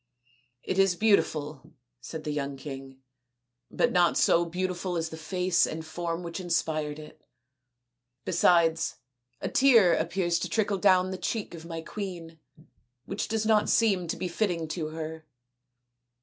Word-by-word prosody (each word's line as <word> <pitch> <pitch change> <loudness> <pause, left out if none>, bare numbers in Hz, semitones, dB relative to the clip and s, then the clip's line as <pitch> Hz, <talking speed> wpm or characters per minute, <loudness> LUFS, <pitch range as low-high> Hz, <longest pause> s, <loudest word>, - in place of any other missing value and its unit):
" 125 0 -42
It 190 - 0
is 195 -2 +4
beautiful," 155 -8 0 0.3
said 160 -1 -7
the 150 - -3
young 140 -2 -3
king, 135 -1 -9 0.3
" 125 +1 -56
but - - +4
not 175 -1 +3
so 170 +1 +4
beautiful 180 +1 -3
as 165 0 -2
the 160 - -7
face 180 +2 +1
and 160 0 -6
form 170 +1 -4
which 170 +2 -5
inspired 160 -4 -1
it. 155 0 -12 1.0
Besides, 165 -2 +3 0.5
a - - -2
tear 230 -10 +5
appears 170 +1 0
to - - -3
trickle 205 -3 0
down 185 -1 +4
the 185 - -5
cheek 220 -5 -3
of 165 -1 -9
my 165 -1 -5
queen, 170 -4 -7 0.7
which 195 - -3
does 220 0 -1
not 215 -1 +3
seem 195 -6 +2
to - - -3
be 185 - -3
fitting 175 -3 -1
to 155 -1 -3
her." 160 0 -7
170 Hz, 155 wpm, -28 LUFS, 155-185 Hz, 1.0 s, tear